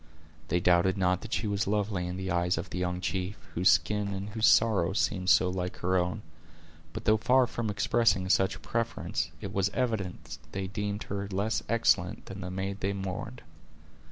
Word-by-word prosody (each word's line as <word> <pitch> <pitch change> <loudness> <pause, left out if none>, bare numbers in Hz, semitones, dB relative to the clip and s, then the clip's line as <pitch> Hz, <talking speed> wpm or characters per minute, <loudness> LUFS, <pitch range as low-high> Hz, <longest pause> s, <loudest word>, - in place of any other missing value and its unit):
They 90 +2 +1
doubted 90 +2 +3
not 90 -1 +1
that 110 - -9
she - - -1
was 100 -2 -1
lovely 100 -3 0
in 90 +1 -4
the 95 0 -3
eyes 90 0 +1
of 85 0 -5
the 90 - -3
young 90 0 -2
chief, 95 +2 -2 0.2
whose 90 +2 +4
skin 105 -1 +2
and 95 +2 -5
whose 110 +1 +2
sorrow 105 -5 +4
seemed 95 -2 0
so 90 +1 +5
like 90 0 -3
her 95 +1 0
own; 90 +4 0 0.7
but 110 +2 -7
though 110 -1 +5
far 125 +4 +4
from 115 -2 -3
expressing 105 -1 +2
such 95 +1 +2
a - - -11
preference, 115 0 -2
it - - -6
was 95 0 +1
evident 95 - -2
they 95 0 -2
deemed 105 +1 -3
her 100 0 -4
less 100 +3 -1
excellent 105 -6 +2
than 95 0 -8
the 90 - -5
maid 95 +2 -4
they 100 +1 -1
mourned. 100 +6 -5
95 Hz, 190 wpm, -29 LUFS, 90-105 Hz, 0.7 s, so